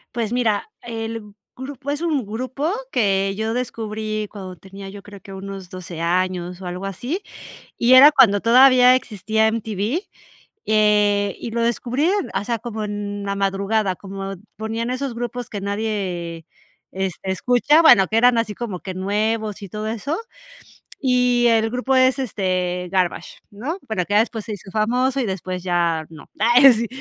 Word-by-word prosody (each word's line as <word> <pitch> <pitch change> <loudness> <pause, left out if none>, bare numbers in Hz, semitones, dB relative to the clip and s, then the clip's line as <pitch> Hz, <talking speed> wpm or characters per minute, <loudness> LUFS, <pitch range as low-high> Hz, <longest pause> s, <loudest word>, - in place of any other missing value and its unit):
Pues, 230 -2 -2
mira, 240 - 0
el 225 -2 -6 0.2
grupo 275 +1 -6
es 290 - -2
un 305 -9 -1
grupo 255 - -3 0.2
que 195 - +1
yo 220 +1 -2
descubrí 215 -3 -3
cuando 190 -3 -8
tenía 195 +3 -11
yo 200 +1 -10
creo 205 -1 -12
que 195 0 -12
unos 195 -1 -8
12 175 -2 -8
años, 180 +1 -1
o 185 - -8
algo 180 +2 -5
así, 245 - -4 0.6
y 240 +2 +3
era 280 +4 +10
cuando 220 -9 +5
todavía 255 +1 +6
existía 220 -2 0
MTV. 220 - -2 0.7
Eh, 210 -2 +3
y - - -5
lo 230 +1 -1
descubrí, 245 +5 0 0.3
o - - -6
sea, 235 +1 -2
como 220 -1 -5
en 205 -1 -4
la 200 0 -2
madrugada, 195 0 0
como 195 +1 -7 0.2
ponían 225 +3 -3
esos 255 -1 -3
grupos 240 0 -5
que 205 - -5
nadie, 195 -5 -3 0.5
este, 190 0 -3
escucha, 250 - +3
bueno, 205 -12 +7
que 220 - 0
eran 245 +1 +5
así 230 -2 0
como 205 -4 -5
que 190 - -6
nuevos 210 +3 -1
y 200 - -8
todo 210 +3 -5
eso, 250 - -3 0.9
y 250 -1 +3
el 225 -1 +3
grupo 250 +2 0
es, 260 +1 +4
este, 185 -6 -2
Garbage, 180 -2 -1
¿no? 250 - -4
Bueno, 220 -5 -1
acá 205 +4 +2
después 225 -1 -2
se 220 - -6
hizo 200 -1 -9
famoso 250 +6 +1
y 265 - +1
después 185 -2 -4
ya 170 -3 0
no. 160 - -12
Ay, 245 +5 +7
sí. 230 0 -1
215 Hz, 165 wpm, -21 LUFS, 195-240 Hz, 0.9 s, era